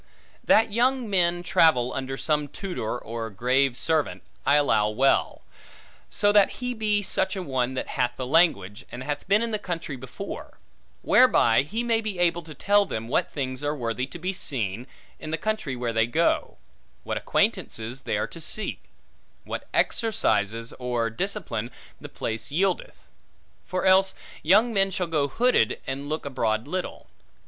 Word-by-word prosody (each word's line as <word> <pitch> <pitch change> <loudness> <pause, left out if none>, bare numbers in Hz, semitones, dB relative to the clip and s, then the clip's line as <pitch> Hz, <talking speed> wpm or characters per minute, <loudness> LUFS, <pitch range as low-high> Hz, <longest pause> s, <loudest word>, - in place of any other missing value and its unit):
That 220 0 +4
young 250 +2 +1
men 175 -3 +1
travel 130 -8 +3
under 135 0 -4
some 150 -1 0
tutor, 160 - -4
or 115 -1 -5
grave 125 +5 +1
servant, 160 -2 0 0.2
I 140 - +6
allow 110 -8 +3
well; 130 +6 +1 0.7
so 205 - +2
that 205 -1 +5
he 250 0 -4
be 210 -2 0
such 190 +1 0
a 190 - -4
one 130 -3 -1
that - - -4
hath 125 0 0
the 130 - -3
language, 125 - +2
and 125 +1 -6
hath 145 +1 -4
been 205 +4 +3
in 230 - -2
the 215 - -1
country 165 -7 -4
before; 130 0 -8 0.5
whereby 115 +1 +5
he 215 - -3
may 230 -1 +1
be 215 -4 -4
able 175 -1 +2
to 155 -2 -11
tell 205 +6 +3
them 115 +1 -4
what 140 - +1
things 130 -1 -4
are 145 +1 0
worthy 125 0 -2
to 135 - -9
be 185 +3 -3
seen, 120 - -3 0.3
in 155 - -7
the 160 - -1
country 215 -8 -2
where 120 -2 -2
they 115 0 +2
go; 155 - +1 0.5
what - - -3
acquaintances 115 +4 -1
they - - -1
are - - 0
to 165 - -10
seek; 215 +7 -5 0.6
what - - -6
exercises, 115 - +1
or 120 -2 -1
discipline, 120 - -3 0.3
the - - -9
place 110 0 -4
yieldeth. 195 - -1 0.6
For 185 +1 -2
else, 190 0 +5 0.3
young 215 +8 +4
men 195 -1 +3
shall 185 -1 -2
go 155 -4 0
hooded, 225 - +2
and 140 +2 -4
look 155 0 -3
abroad 115 -3 -1
little. 185 +4 -4
150 Hz, 165 wpm, -25 LUFS, 125-195 Hz, 0.7 s, I